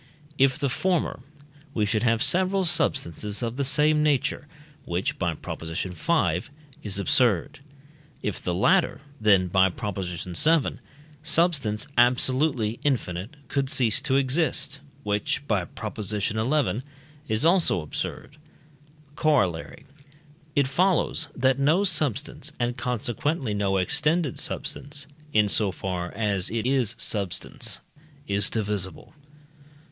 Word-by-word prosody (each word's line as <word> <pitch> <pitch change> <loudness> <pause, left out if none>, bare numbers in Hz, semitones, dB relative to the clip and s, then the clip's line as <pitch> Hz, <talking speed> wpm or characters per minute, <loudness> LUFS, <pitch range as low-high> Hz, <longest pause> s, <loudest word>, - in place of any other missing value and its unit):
If 135 -1 +4
the 140 - 0
former, 175 +5 0 0.6
we 105 - +2
should 105 +1 0
have 115 -1 +2
several 190 +1 +2
substances 130 - 0
of 115 0 -2
the 140 - -1
same 150 +3 +3
nature, 145 -1 +1 0.4
which 85 +3 -2
(by 85 -3 0
Prop. - - -7
v.) 90 - 0 0.4
is 100 -2 +1
absurd. 105 -1 +2 0.6
If 105 - -3
the 90 - -2
latter, 175 - +2 0.2
then 100 -4 +4
(by 95 +1 +3
Prop. 105 0 -5
vii.) 90 0 -5 0.9
substance 155 -8 +1
absolutely 125 -1 +2
infinite 110 -5 -1
could 135 -1 -1
cease 125 -6 +2
to 135 -1 +1
exist, 140 +1 +1 0.2
which 105 +7 -1
(by 100 -5 +1
Prop. - - -7
xi.) 105 +1 -1 0.9
is 110 +6 +1
also 170 - +4
absurd. 100 - -5 0.8
Corollary. 100 - 0 0.7
It 140 - +4
follows, 170 +1 +2
that 130 +1 +2
no 155 +8 +3
substance, 155 - -1
and 120 0 0
consequently 125 +2 -2
no 100 -1 +1
extended 150 - +1
substance, 140 0 -3 0.3
in 105 -4 +4
so 100 0 +2
far 90 -2 -4
as 100 -4 0
it 115 0 -2
is 130 -4 +1
substance, 100 -5 -1 0.5
is 100 0 +2
divisible. 105 -2 -2
120 Hz, 120 wpm, -25 LUFS, 100-145 Hz, 0.9 s, If